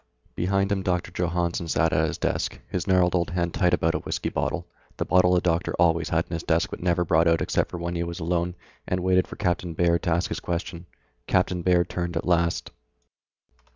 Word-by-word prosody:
Behind 100 +2 0
him 100 -1 +1
Doctor 90 -2 -1
Johannsen 85 -1 -1
sat 80 0 +1
at 80 +2 +2
his - - -4
desk, - - -2
his 90 - -3
gnarled 90 -2 +3
old 85 -2 +1
hand 85 -2 -1
tight 90 -1 +2
about 85 -2 +2
a - - -1
whiskey - - -3
bottle, - - -2 0.3
the - - -1
bottle 90 0 +4
the 90 - +3
doctor 85 -1 0
always 85 -2 +2
had 80 +1 +1
in - - -9
his 85 - -2
desk 85 +4 0
but - - -6
never 90 -1 +1
brought 80 0 +3
out 85 0 +3
except - - 0
when 85 0 -4
he 85 - -2
was 85 +1 -5
alone, 85 +1 -1 0.3
and 90 0 -1
waited 95 0 +3
for - - -8
Captain 90 -1 -1
Baird 85 0 +2
to 90 - -2
ask 85 +2 +1
his - - -3
question. 85 0 -4 0.4
Captain 90 -1 +1
Baird 90 0 +3
turned 85 -1 -3
at - - -2
last. 85 -1 +1
85 Hz, 215 wpm, -25 LUFS, 85-90 Hz, 0.4 s, bottle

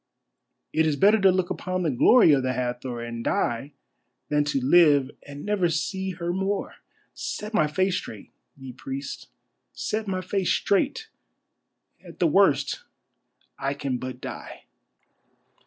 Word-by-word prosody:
It 160 0 +3
is 150 - +1
better 205 +6 +4
to 195 -1 +6
look 185 0 0
upon 185 0 -2
the 160 - +1
glory 165 - +6
of 135 - +3
the 130 0 -1
Hathor 125 -1 -3
and 115 0 -6
die 125 +6 -1 0.6
than 150 0 +2
to 145 -2 0
live 145 -1 +5 0.2
and 145 0 -8
never 205 -4 +1
see 190 +4 -2
her 175 0 -3
more. 195 +2 -2 0.4
Set 210 +2 -5
my 155 -7 +3
face 185 +4 +1
straight, 105 - -8 0.3
ye 135 -2 -9
priests, 135 +2 -6 0.5
set 215 0 -3
my 185 -1 -2
face 185 0 -1
straight, 285 - +1 1.0
at - - -13
the - - +2
worst - - +3 0.8
I 140 +1 -1
can 135 -3 -3
but 130 0 -6
die." - - -8
155 Hz, 145 wpm, -25 LUFS, 135-190 Hz, 1.0 s, to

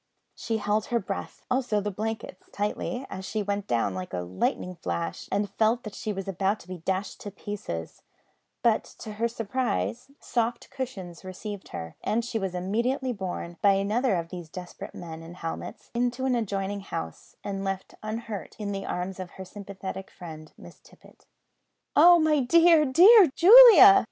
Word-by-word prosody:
She 225 -1 -3
held 210 0 0
her 240 - 0
breath, 195 -3 -5
also 250 -5 +1
the 205 +1 -3
blankets, 215 -2 -5
tightly, 210 +5 -3
as 190 - -7
she 215 +2 -2
went 200 0 -3
down 115 -5 0
like 95 0 -6
a 90 - -2
lightning 95 - -2
flash, 85 - -4
and 205 +1 0
felt 225 +2 +1
that 215 - -7
she 215 - -4
was 195 -1 -5
about 195 +2 0
to - - -17
be 185 -1 -7
dashed 190 +4 -3
to 205 - -6
pieces, 195 - -6 0.6
but 230 -2 +3
to 220 - -8
her 225 +3 0
surprise 225 - -2
soft 235 0 -2
cushions 200 -11 -6
received 195 +2 -7
her, 80 0 -7
and 230 +1 0
she 230 -2 -2
was 190 -3 -3
immediately 235 +8 -1
borne, 180 -4 -5
by 200 -1 +5
another 205 +4 +1
of 165 -1 -3
these 175 -3 -8
desperate 180 +1 -9
men 165 -2 -8
in 165 +2 -10
helmets, 165 -2 -7
into 245 +2 -1
an 260 - +2
adjoining 200 -3 -2
house, 80 - -7
and 195 -1 -4
left 195 -1 -4
unhurt 215 -4 -6
in 205 -2 -4
the 195 -1 -4
arms 180 +1 -4
of 185 -1 -6
her 190 - -7
sympathetic 195 0 -8
friend 155 -3 -10
Miss - - -14
Tippet. - - -21 0.7
"Oh, 350 0 +8
my 310 -2 +3
dear, 330 +4 +5
dear 370 - +8
Julia!" 405 -1 +10
200 Hz, 170 wpm, -27 LUFS, 185-235 Hz, 0.7 s, Julia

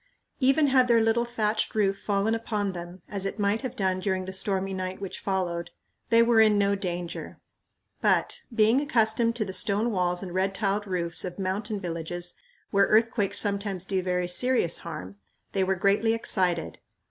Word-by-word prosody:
Even 275 +3 +4
had 260 -2 +4
their 235 -1 +5
little 225 +1 +2
thatched 220 -3 -1
roof 195 -2 +1
fallen 205 +2 0
upon 215 -3 -2
them, 175 0 -9
as 200 -2 -4
it 195 - -3
might 205 +1 +1
have 255 -2 -5
done 190 -5 0
during 185 -1 -1
the 190 - -6
stormy 195 0 -2
night 185 0 -4
which 195 -2 -6
followed, 180 -3 -2 0.4
they 230 0 +6
were 230 -1 +5
in 215 -1 +5
no 200 0 +3
danger; 175 -3 -5 0.6
but, - - +1
being 225 +3 +4
accustomed 230 -3 +2
to 220 -3 0
the 190 - -6
stone 210 +5 +2
walls 180 -2 0
and 180 -2 -7
red 190 +1 0
tiled 205 0 -1
roofs 170 -3 -1
of 180 -1 -6
mountain 200 +2 -2
villages 175 0 -4 0.4
where 200 -1 +4
earthquakes 215 -2 +2
sometimes 200 -3 0
do 190 -1 0
very 180 -1 -1
serious 205 -2 +1
harm, 100 - -8 0.3
they 195 - +1
were 190 +1 +1
greatly 205 +4 +2
excited. 180 -7 -1
200 Hz, 175 wpm, -27 LUFS, 185-220 Hz, 0.6 s, they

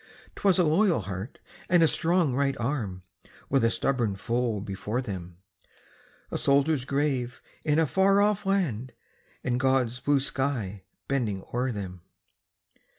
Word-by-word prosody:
'Twas 195 -2 +3
a 180 - +5
loyal 170 - +3
heart, 95 +4 -6 0.3
and 175 -2 +5
a - - +6
strong 170 -3 +2
right 135 +1 +1
arm, 115 -8 -3 0.5
With 135 -3 +3
a 115 - +5
stubborn 115 -4 0
foe 115 +1 -1
before 105 +4 -3
them; 90 -8 -6 0.9
A - - -2
soldier's 140 -1 +2
grave 135 -3 -1 0.2
in 150 -1 +2
a 160 - +4
far 195 +5 +3
off 205 -1 +2
land, 150 - -1 0.5
And 125 -1 0
God's 130 -2 +1
blue 145 +1 +2
sky 130 -8 -2 0.3
bending 110 -8 -1
o'er 125 +2 0
them. 95 -5 -6
130 Hz, 140 wpm, -27 LUFS, 110-150 Hz, 0.9 s, a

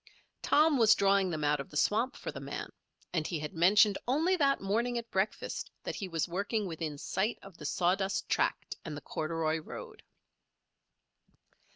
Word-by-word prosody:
Tom 300 -2 +4
was 220 -2 +7
drawing 195 -1 +3
them 155 -3 -3
out 145 0 +2
of 140 - -6
the 150 - -5
swamp 230 - +2
for - - -5
the - - -7
man; - - -6 0.4
and 160 -3 0
he 170 - -2
had 150 +2 -5
mentioned 195 +4 +5
only 320 +9 +3
that 280 -5 +3
morning 230 +5 0
at 235 -1 -6
breakfast 190 +2 -2
that - - -3
he 195 - -4
was 165 -2 -1
working 200 +4 -1
within 160 -4 -4
sight 195 +9 -1
of 195 -3 -12
the 150 - -4
sawdust 190 +4 0
tract - - 0
and 155 -3 -6
the - - -7
corduroy 160 0 -1
road. 155 - -9
195 Hz, 175 wpm, -31 LUFS, 160-225 Hz, 0.4 s, was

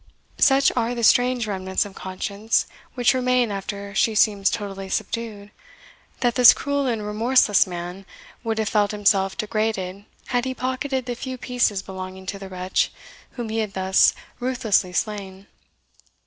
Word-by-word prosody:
Such 275 -1 +5
are 240 0 0
the 235 - -3
strange 245 +1 +4
remnants 190 -2 -1
of 200 - -10
conscience 200 +4 -2 0.3
which 245 0 +3
remain 250 -3 +1
after 200 0 -5
she 220 +1 +2
seems 205 -2 +3
totally 195 -3 -5
subdued, 210 -1 -4 0.7
that 245 -1 +2
this 250 -1 +8
cruel 285 -1 -1
and 225 -4 -2
remorseless 215 -1 +3
man 180 +2 -7 0.4
would 225 -1 -2
have 220 -1 0
felt 205 -2 +2
himself 195 -2 +1
degraded 210 -3 -2 0.2
had 245 0 0
he 260 0 -3
pocketed 260 0 -2
the 245 - -3
few 255 +2 -6
pieces 240 -6 0
belonging 190 0 -8
to 200 +1 -5
the 195 -1 -8
wretch 185 0 -1 0.4
whom 240 -3 -5
he 225 +1 -1
had 215 -3 -2
thus 190 0 +3 0.2
ruthlessly 235 -7 +1
slain. 195 -1 -4
215 Hz, 150 wpm, -23 LUFS, 195-245 Hz, 0.7 s, this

